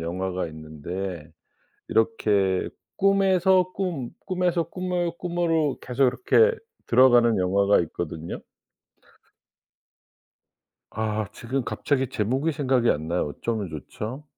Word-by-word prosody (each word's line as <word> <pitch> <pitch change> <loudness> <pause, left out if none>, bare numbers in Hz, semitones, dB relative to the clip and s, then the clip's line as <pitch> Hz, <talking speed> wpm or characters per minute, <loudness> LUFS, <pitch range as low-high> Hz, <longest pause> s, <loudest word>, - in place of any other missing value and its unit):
영화가 90 +2 -3
있는데 80 +2 -6 0.6
이렇게 105 -4 +1 0.3
꿈에서 190 -2 +3
꿈 170 -11 -3 0.2
꿈에서 180 -2 0
꿈을 180 -1 -2
꿈으로 165 -5 0
계속 130 +2 +1
이렇게 450 - +3 0.3
들어가는 120 -3 +5
영화가 100 +2 +3
있거든요. 80 0 -5 2.5
아 110 -1 -2
지금 130 +2 -3
갑자기 135 0 -1
제목이 130 +6 0
생각이 130 -5 +2
안 80 +2 -2
나요. 85 -3 0
어쩌면 105 +5 -3
좋죠. 105 - -7
120 Hz, 240 characters per minute, -25 LUFS, -, 2.5 s, 들어가는